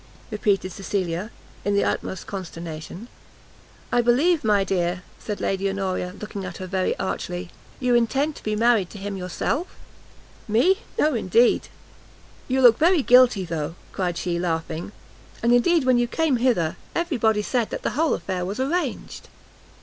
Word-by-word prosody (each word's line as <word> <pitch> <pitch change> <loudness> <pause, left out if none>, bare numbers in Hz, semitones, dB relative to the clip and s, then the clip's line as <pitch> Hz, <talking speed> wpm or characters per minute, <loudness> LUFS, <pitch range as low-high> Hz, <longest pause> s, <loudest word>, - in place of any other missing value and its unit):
repeated 200 -3 0
Cecilia, 190 -1 -3 0.3
in 205 0 +1
the 200 - +3
utmost 190 - -2
consternation. 170 +1 -7 0.8
"I 245 - +4
believe, 290 +8 +3
my 205 -3 +3
dear," 180 -1 -1 0.2
cried 210 -2 -4
Lady 195 0 0
Honoria, 190 -2 -3
looking 210 -2 -6
at 180 -2 -6
her 185 - -6
very 185 0 -1
archly, 180 -1 -4 0.3
"you 250 -1 +1
intend 270 +6 +2
to - - -11
be 215 0 -1
married 225 -4 +3
to - - -10
him 200 0 -5
yourself?" 190 - -3 0.7
"Me? 290 - +3 0.2
no, 305 0 +3
indeed!" 230 +1 +3 0.8
"You 265 +1 +1
look 235 -2 +7
very 335 -1 +4
guilty, 245 -6 +5
though," 165 -1 -4 0.2
cried 180 -3 -2
she 175 -1 -2
laughing, 165 0 -3 0.5
"and 235 +1 +4
indeed 320 +6 +4
when 255 -1 +4
you 240 - +1
came 310 0 +1
hither, 230 -10 +1 0.2
every 340 -4 0
body 220 -2 +2
said 240 0 0
that - - -5
the - - 0
whole 315 +4 +1
affair 185 -1 -3
was 195 +6 -4
arranged." 320 +7 -2
210 Hz, 155 wpm, -24 LUFS, 185-245 Hz, 0.8 s, look